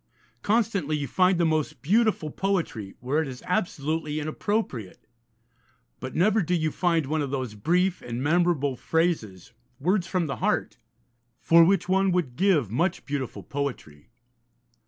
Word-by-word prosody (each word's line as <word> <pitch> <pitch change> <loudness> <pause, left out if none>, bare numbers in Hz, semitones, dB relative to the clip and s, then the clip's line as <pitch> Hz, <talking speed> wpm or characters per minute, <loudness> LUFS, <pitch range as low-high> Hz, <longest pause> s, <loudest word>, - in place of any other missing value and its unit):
Constantly 200 -9 +1
you 145 -1 -3
find 185 +6 +3
the 170 - +3
most 155 -6 -1
beautiful 205 -4 +2
poetry 165 - -2
where 140 +6 0
it 160 - -3
is 125 -2 -8
absolutely 155 -5 -1
inappropriate, 155 - -3 0.9
but 130 - -7
never 215 +6 +3
do 180 +1 0
you 155 -2 0
find 165 -3 +1
one 155 +3 -1
of 140 - -2
those 130 -5 -3
brief 180 - +1
and 120 +1 -5
memorable 155 -4 +2
phrases, 120 - -1 0.3
words 180 +4 +1
from 185 -2 0
the 140 - -4
heart, 210 -6 -1 0.6
for 165 0 +6
which 175 0 +2
one 190 +1 +2
would 170 -9 -1
give 165 - +2
much 170 +9 0
beautiful 140 -3 -4
poetry. 125 - -5
160 Hz, 145 wpm, -26 LUFS, 135-185 Hz, 0.9 s, for